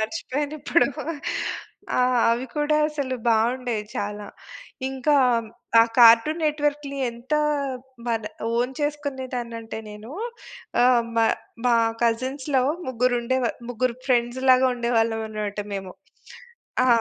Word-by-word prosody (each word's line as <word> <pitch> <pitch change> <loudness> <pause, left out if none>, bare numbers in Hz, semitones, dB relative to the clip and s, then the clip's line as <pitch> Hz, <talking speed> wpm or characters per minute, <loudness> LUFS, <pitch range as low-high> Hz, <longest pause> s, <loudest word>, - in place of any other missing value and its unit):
మర్చిపోయానిప్పుడు. 295 +5 0 1.1
ఆహ్, 250 -1 +3
అవి 240 +3 0
కూడా 295 +1 +2
అసలు 285 -4 -3
బాగుండేయి 230 0 +1
చాలా. 205 0 -4 0.6
ఇంకా 270 +3 +1 0.7
ఆ - - +9 0.2
కార్టూన్ 235 +8 +7
నెట్ 300 -1 0
వర్క్‌లి 285 -1 -2
ఎంత 240 +6 -4 0.7
మన 225 -1 0 0.3
ఓన్ 245 +2 0
చేసుకునేదానంటే 255 -6 -4
నేను. 210 +3 -10 0.7
ఆహ్, 245 -1 +5
మా 225 0 +4 0.4
మా 245 - +4 0.3
కజిన్స్‌లో 260 +3 +1 0.2
ముగ్గురుండేవా 250 0 +1 0.2
ముగ్గురు 245 0 -1
ఫ్రెండ్స్ 240 0 +1
లాగా 255 0 +6
ఉండేవాళ్ళమనమాట 225 -3 -1 0.2
మేము. 190 -2 -5 0.9
ఆ! - - +2
245 Hz, 100 wpm, -24 LUFS, 230-265 Hz, 1.1 s, ఆ